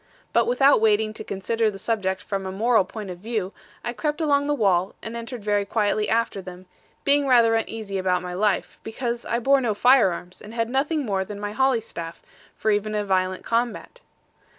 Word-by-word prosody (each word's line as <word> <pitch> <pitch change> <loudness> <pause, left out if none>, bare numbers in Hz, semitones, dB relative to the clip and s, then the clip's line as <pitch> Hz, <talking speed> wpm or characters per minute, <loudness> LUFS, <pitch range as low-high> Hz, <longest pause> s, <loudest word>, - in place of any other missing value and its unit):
But - - +3
without 285 - +4
waiting 215 0 +2
to - - -7
consider 220 +3 -1
the 200 - -7
subject 195 -3 -2
from 195 -1 -3
a - - -4
moral 220 +1 +2
point 205 -1 -7
of 175 - -9
view, 210 -2 -3 0.3
I 240 - -3
crept 300 +4 -2
along 285 -3 +2
the 295 - +1
wall, 190 -5 +1
and 225 +1 -6
entered 235 -1 -6
very 205 -1 +1
quietly 210 0 0
after 225 -3 0
them; 180 0 -10 0.4
being 285 0 +3
rather 235 -3 +5
uneasy 220 -3 -2
about 180 -1 0
my 180 0 -5
life, 200 +1 0
because 235 +1 -4
I 235 - 0
bore 270 +3 +3
no 225 -4 0
fire 245 -3 +5
arms, 175 +1 -8
and 215 +2 -10
had 230 0 -1
nothing 290 +2 0
more 195 -3 0
than 205 +1 -8
my 205 0 -4
holly 260 +1 +2
staff, 170 -6 -8 0.3
for 220 - 0
even 210 +1 0
a 210 -1 -1
violent 185 -1 0
combat. 240 - -2
215 Hz, 200 wpm, -24 LUFS, 195-240 Hz, 0.4 s, rather